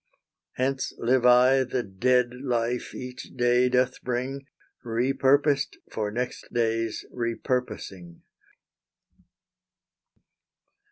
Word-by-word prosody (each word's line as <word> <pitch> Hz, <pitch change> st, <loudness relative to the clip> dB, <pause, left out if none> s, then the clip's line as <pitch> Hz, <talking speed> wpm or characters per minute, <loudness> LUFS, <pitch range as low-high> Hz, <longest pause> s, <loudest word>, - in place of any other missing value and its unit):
Hence 130 Hz, +1 st, -1 dB
live 125 Hz, +1 st, +2 dB
I 125 Hz, +2 st, +6 dB
the 125 Hz, -1 st, -2 dB
dead 120 Hz, +5 st, +1 dB
life 120 Hz, -2 st, -1 dB
each 125 Hz, +1 st, -8 dB
day 125 Hz, 0 st, +3 dB
doth 125 Hz, 0 st, +1 dB
bring, 130 Hz, +3 st, -3 dB, 0.4 s
Repurposed 135 Hz, +4 st, +2 dB
for 105 Hz, -1 st, -2 dB
next 120 Hz, +4 st, -4 dB
day's 115 Hz, -1 st, -1 dB
repurposing. 115 Hz, -7 st, -3 dB
125 Hz, 80 wpm, -26 LUFS, 115-130 Hz, 0.4 s, I